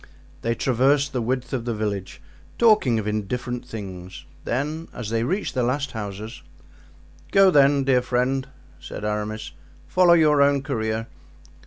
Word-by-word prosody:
They 115 0 0
traversed 135 +4 +2
the 125 - -1
width 125 +3 -2
of 125 -3 -1
the 120 -2 -2
village, 105 -3 -4 0.3
talking 215 - +4
of 110 - -2
indifferent 120 +4 -3
things, 95 -5 -8 0.2
then 150 +6 -2
as 115 -3 -5
they 115 0 +1
reached 185 - -1
the 130 - 0
last 135 +3 -1
houses: 105 0 -6 0.9
"Go, 195 -1 +6
then, 140 -2 +5
dear 130 -2 +3
friend," 125 +2 0 0.3
said 105 - -7
Aramis, 105 +1 -3 0.3
"follow 180 -2 +4
your 150 -3 +4
own 140 -1 +3
career. 110 -5 -2
125 Hz, 145 wpm, -23 LUFS, 110-140 Hz, 0.9 s, Go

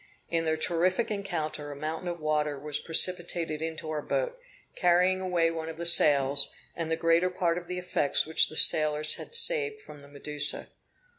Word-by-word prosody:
In 165 -1 -1
their 160 0 -1
terrific 180 +7 -1
encounter 160 -7 -5
a - - -9
mountain 155 +4 -6
of 175 -1 -5
water 150 -1 -2
was 145 +1 -4
precipitated 170 -2 +1
into 160 -1 -6
our 150 -1 -4
boat, - - -4 0.4
carrying 180 +1 +1
away 175 -3 -1
one 160 -1 -6
of 160 - -9
the 170 - -6
sails, 140 -4 +4 0.2
and 165 -1 -5
the 160 - 0
greater 165 +2 +1
part 175 -2 -2
of 175 - -16
the 180 0 -6
effects 180 -5 -1
which 160 +1 +4
the 155 - -7
sailors 155 0 +5
had - - -6
saved 455 -2 +3
from 150 - -15
the 140 - -16
Medusa. 145 +1 -3
165 Hz, 180 wpm, -27 LUFS, 155-180 Hz, 0.4 s, sailors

